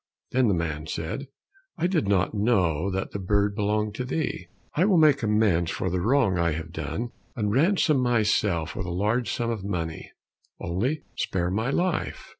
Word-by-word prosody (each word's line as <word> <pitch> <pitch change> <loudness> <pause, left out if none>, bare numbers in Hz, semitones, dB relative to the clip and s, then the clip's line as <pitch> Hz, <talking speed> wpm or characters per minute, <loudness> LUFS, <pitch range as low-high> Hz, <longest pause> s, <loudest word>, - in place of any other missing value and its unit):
Then 130 -1 +3
the 100 - +3
man 80 -2 -3
said, 80 - -4 0.5
"I 165 - 0
did 175 - +1
not 100 -1 +2
know 100 -6 +1
that 95 0 -3
the 100 - -4
bird 100 +2 +1
belonged 105 +1 0
to 125 - -3
thee. 140 +5 -3 0.3
I 165 - +2
will 195 -2 +4
make 150 -3 +5
amends 105 -6 +2
for 95 - -2
the 90 0 0
wrong 110 -4 +2
I 85 -1 +2
have 80 +1 -5
done 120 +2 -4 0.2
and 105 -3 -1
ransom 155 - +3
myself 105 -8 +1
with 95 - -4
a - - -3
large 105 +7 0
sum 115 -1 -1
of 110 -4 -4
money, 85 -5 -4 0.5
only 120 - -1
spare 90 -1 -1
my 110 +6 0
life." 175 +4 -1
105 Hz, 180 wpm, -26 LUFS, 90-125 Hz, 0.5 s, make